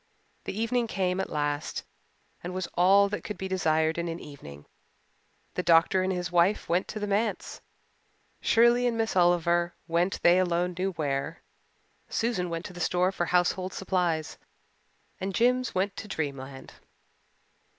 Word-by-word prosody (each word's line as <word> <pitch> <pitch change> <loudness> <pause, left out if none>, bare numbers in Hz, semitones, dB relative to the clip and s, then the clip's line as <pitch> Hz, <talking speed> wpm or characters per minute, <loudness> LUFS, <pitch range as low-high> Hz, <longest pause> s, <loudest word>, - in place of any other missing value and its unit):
The 200 - -4
evening 235 +1 0
came 185 -3 -1
at 190 - -2
last 145 0 -2 0.6
and 180 +1 -5
was 185 -1 -2
all 195 +3 +5
that 210 - -4
could 210 - -6
be 190 - -4
desired 160 -3 +1
in 170 - -2
an 165 0 -4
evening. 75 - -11 0.9
The - - -1
doctor 170 +2 +4
and 185 +1 0
his 180 -1 -3
wife 175 +4 +2
went 180 +3 +1
to 215 - -5
the 205 - -2
Manse, 205 +3 -2 0.8
Shirley 235 +2 +4
and 235 -1 -1
Miss 225 -3 -1
Oliver 175 -1 +2
went 175 +3 0
they 175 +1 +6
alone 180 0 0
knew 190 +2 -1
where, 140 -4 -3 0.7
Susan 225 -6 -1
went 165 0 -4
to - - -8
the 175 - -9
store 180 +1 +2
for 175 -3 -2
household 180 +1 +1
supplies, 175 -5 -1 0.8
and 190 0 -3
Jims 250 +1 +2
went 195 +2 0
to 215 - -6
Dreamland. 140 -6 -5
180 Hz, 155 wpm, -28 LUFS, 170-195 Hz, 0.9 s, they